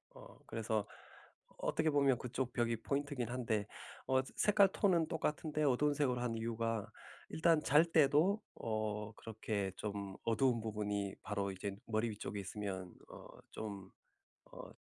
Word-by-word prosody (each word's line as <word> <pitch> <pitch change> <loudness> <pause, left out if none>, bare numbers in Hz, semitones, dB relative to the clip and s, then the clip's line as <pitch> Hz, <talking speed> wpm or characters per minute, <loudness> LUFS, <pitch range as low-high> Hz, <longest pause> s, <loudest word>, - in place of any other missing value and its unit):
어 - - -13
그래서 110 -2 -1 0.7
어떻게 160 0 +1
보면 140 -3 +4
그쪽 125 0 -3
벽이 115 -1 +1
포인트이긴 140 -3 -1
한데 115 -4 -1 0.4
어 130 0 +4
저 135 - -12
색깔 205 -2 +5
톤은 180 -5 +3
똑같은데 155 0 -1
어두운색으로 140 -2 +2
한 120 -2 -1
이유가 115 -1 -2 0.4
일단 160 -1 +3
잘 150 +3 +6
때도 165 +6 +4
어 110 -1 -2
그렇게 105 -3 -3
좀 100 -2 -4
어두운 115 0 +2
부분이 105 -2 -2
바로 100 -2 -1
이제 95 +1 -4
머리 115 +1 +1
위쪽에 105 -1 -5
있으면 95 -2 -5 0.2
어 - - -10 0.2
좀 100 -3 -6 0.6
어 - - -9
115 Hz, 285 characters per minute, -36 LUFS, 105-145 Hz, 0.7 s, 잘